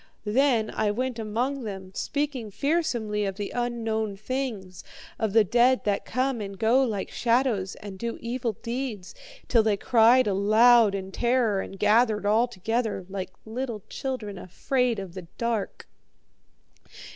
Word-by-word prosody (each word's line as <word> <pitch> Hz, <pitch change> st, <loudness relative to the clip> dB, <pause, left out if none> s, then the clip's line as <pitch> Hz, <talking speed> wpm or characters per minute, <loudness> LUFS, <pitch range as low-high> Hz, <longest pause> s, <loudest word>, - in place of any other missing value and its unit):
Then 235 Hz, 0 st, +2 dB
I 215 Hz, -1 st, 0 dB
went 245 Hz, +3 st, -2 dB
among 240 Hz, +5 st, -2 dB
them, 190 Hz, -3 st, -7 dB
speaking 280 Hz, -5 st, -2 dB
fearsomely 235 Hz, -, -1 dB
of 195 Hz, -1 st, -2 dB
the 205 Hz, 0 st, -5 dB
unknown 225 Hz, -4 st, -2 dB
things, 215 Hz, -6 st, -4 dB, 0.4 s
of 220 Hz, -2 st, 0 dB
the 225 Hz, -1 st, +6 dB
dead 245 Hz, +5 st, +3 dB
that 205 Hz, -1 st, -1 dB
come 255 Hz, -1 st, -1 dB
and 200 Hz, -1 st, -6 dB
go 230 Hz, +5 st, +3 dB
like 215 Hz, -6 st, -3 dB
shadows 235 Hz, -5 st, +1 dB
and 195 Hz, -2 st, -9 dB
do 235 Hz, 0 st, -3 dB
evil 235 Hz, -1 st, -2 dB
deeds, 235 Hz, -6 st, -4 dB, 0.3 s
till 230 Hz, -, +4 dB
they 215 Hz, -2 st, +1 dB
cried 240 Hz, +3 st, +5 dB
aloud 215 Hz, +2 st, +5 dB
in 190 Hz, -1 st, -5 dB
terror 235 Hz, -3 st, +1 dB
and 195 Hz, -, -8 dB
gathered 215 Hz, +1 st, +3 dB
all 220 Hz, +4 st, +3 dB
together, 225 Hz, -2 st, -2 dB
like 190 Hz, -1 st, -4 dB, 0.2 s
little 225 Hz, -2 st, -4 dB
children 220 Hz, -8 st, -4 dB
afraid 250 Hz, +6 st, -1 dB
of 190 Hz, -3 st, -6 dB
the 185 Hz, -2 st, -8 dB
dark. 235 Hz, -3 st, -3 dB
225 Hz, 145 wpm, -26 LUFS, 205-245 Hz, 0.4 s, the